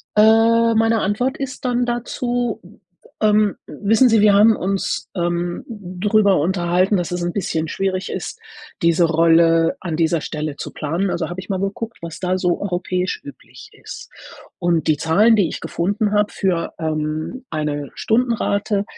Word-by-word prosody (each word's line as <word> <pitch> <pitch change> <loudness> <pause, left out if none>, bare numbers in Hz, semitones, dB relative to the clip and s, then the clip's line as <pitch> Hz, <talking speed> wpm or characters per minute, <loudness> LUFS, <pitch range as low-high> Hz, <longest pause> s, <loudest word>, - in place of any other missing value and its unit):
Äh, 225 +2 +5
meine 225 0 +2
Antwort 245 +7 -1
ist 270 -2 -6
dann 245 -1 0
dazu, 240 0 -2 0.6
ähm: 210 -1 +3
„Wissen 225 +5 +2
Sie, 225 -1 +4
wir 205 0 +5
haben 215 +2 +6
uns, 195 +1 -2
ähm, 175 0 -2
darüber 200 0 +1
unterhalten, 180 +4 +1
dass 175 +1 -3
es 175 - -2
'n 175 0 -1
bisschen 160 -4 -2
schwierig 190 +1 -2
ist, - - -5 0.4
diese 170 +1 +3
Rolle 165 - +3
an 170 -4 -4
dieser 165 0 +1
Stelle 150 -1 -5
zu - - -6
planen. 170 +6 -2
Also, 170 -2 -2
habe 175 - -6
ich 185 - -9
mal 190 - -1
geguckt, 205 +4 -4
was 165 -1 -7
da 185 0 0
so 180 -1 0
europäisch 180 -1 -2
üblich 140 - -13
ist. - - -10 0.5
Und 170 -2 0
die 155 -2 +3
Zahlen, 205 +10 +4
die 190 -5 +3
ich - - -6
gefunden 205 +4 -1
habe 210 0 +1
für, 175 -4 -1
ähm, 155 +10 -3
eine 150 -2 -3
Stundenrate 220 -3 0
190 Hz, 160 wpm, -20 LUFS, 170-220 Hz, 0.6 s, haben